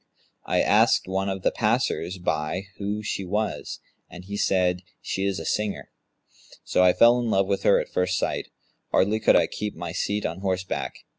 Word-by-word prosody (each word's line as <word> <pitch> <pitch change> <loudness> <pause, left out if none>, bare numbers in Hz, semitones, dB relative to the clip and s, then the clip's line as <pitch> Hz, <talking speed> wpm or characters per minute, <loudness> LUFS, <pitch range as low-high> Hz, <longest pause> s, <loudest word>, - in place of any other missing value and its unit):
I - - +2
asked - - +3
one 95 +1 -1
of 95 -1 -4
the - - +3
passers 90 +3 0
by 80 0 -2
who 105 +1 -3
she 100 - -3
was, 105 +4 -3 0.3
and 90 +1 -11
he 100 +1 -6
said, 90 -3 +1 0.2
'She 95 - -3
is 100 -1 0
a 80 - -7
singer,' 105 +3 -2 0.7
so 90 - +2
I 90 - +6
fell 120 +5 +5
in 120 -2 -1
love 95 -2 +3
with 100 0 -1
her - - +4
at - - -6
first 90 0 +1
sight: - - -2 0.4
hardly 105 +3 +2
could 110 - +4
I - - +5
keep 105 -1 -5
my 85 0 -5
seat 105 +4 -2
on 85 +3 -3
horseback. 95 -1 -2
95 Hz, 190 wpm, -25 LUFS, 90-105 Hz, 0.7 s, I